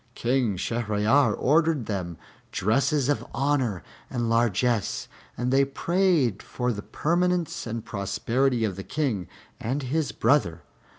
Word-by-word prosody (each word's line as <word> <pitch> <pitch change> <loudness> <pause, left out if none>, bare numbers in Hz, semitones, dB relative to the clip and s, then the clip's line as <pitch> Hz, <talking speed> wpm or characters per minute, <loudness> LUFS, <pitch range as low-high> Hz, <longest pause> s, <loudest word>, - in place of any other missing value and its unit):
King 120 -5 +1
Shahryar 115 +4 +2
ordered 155 -2 +2
them 90 -6 -4 0.3
dresses 135 +6 +1
of 145 - +1
honor 130 - 0 0.3
and 120 -2 -2
largesse, 115 -1 +1 0.3
and 125 +2 0
they 135 +1 +5
prayed 150 - +1
for 125 -1 -2
the 105 - -5
permanence 175 +2 0
and 115 0 -4
prosperity 115 +5 0
of 95 -4 -3
the 95 - -5
King 120 - -2 0.3
and 135 +5 -2
his 150 +4 -1
brother. 110 - +1
125 Hz, 125 wpm, -26 LUFS, 105-145 Hz, 0.3 s, they